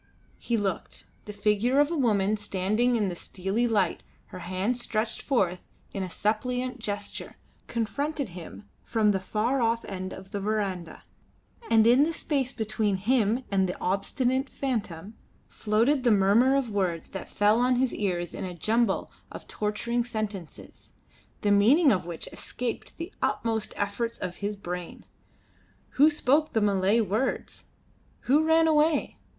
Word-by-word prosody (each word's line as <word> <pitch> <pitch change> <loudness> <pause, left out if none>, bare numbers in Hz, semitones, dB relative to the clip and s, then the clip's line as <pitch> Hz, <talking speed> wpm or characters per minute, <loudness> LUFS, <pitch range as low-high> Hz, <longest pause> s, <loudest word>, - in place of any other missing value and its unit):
He 235 - -1
looked. 195 -4 -3 0.2
The 210 - -6
figure 210 +6 +1
of 290 +2 +3
a - - 0
woman 215 -7 +2
standing 210 +4 0
in 210 -3 +1
the 180 - -3
steely 195 +7 -2
light, 200 -6 +1 0.3
her - - -8
hands 190 +8 -1
stretched 220 0 -2
forth 190 -10 +1 0.3
in 195 - -3
a 185 - -3
suppliant 250 +6 -1
gesture, 205 -2 -5 0.3
confronted 280 +3 -2
him 160 - -10 0.2
from 215 -2 +2
the 195 - 0
far 225 +7 0
off 230 0 +1
end 185 -1 -5
of 190 +1 -10
the 205 - -3
verandah; 195 -5 -3 0.7
and 220 -1 +5
in 245 +4 +6
the 320 +3 +2
space 275 -5 0
between 215 -3 -1
him 225 +3 +1
and 190 -2 +2
the - - -5
obstinate 255 +8 0
phantom 210 -8 -3 0.4
floated 230 +6 +1
the 245 - +4
murmur 215 +6 +4
of 265 -5 0
words 185 -5 -1
that 190 - -7
fell 210 +2 +3
on 250 +1 +3
his 255 0 +1
ears 175 -4 -2
in - - -5
a 180 -2 -5
jumble 220 +3 0 0.2
of - - -9
torturing 235 +3 -1
sentences, 215 -7 -7 0.5
the 205 - +2
meaning 260 +10 +5
of 185 -5 0
which 170 -2 -6
escaped 245 -1 -5
the 340 +4 -6
utmost 225 -2 -1
efforts 230 +3 -2
of 180 -1 -5
his 205 0 -3
brain. 180 -2 -6 0.8
Who 295 +3 +5
spoke 300 +1 +1
the 220 - +2
Malay 200 +2 +3
words? 220 +5 -2 0.6
Who 290 +5 +3
ran 320 0 +4
away? 310 0 +2
215 Hz, 155 wpm, -27 LUFS, 195-250 Hz, 0.8 s, in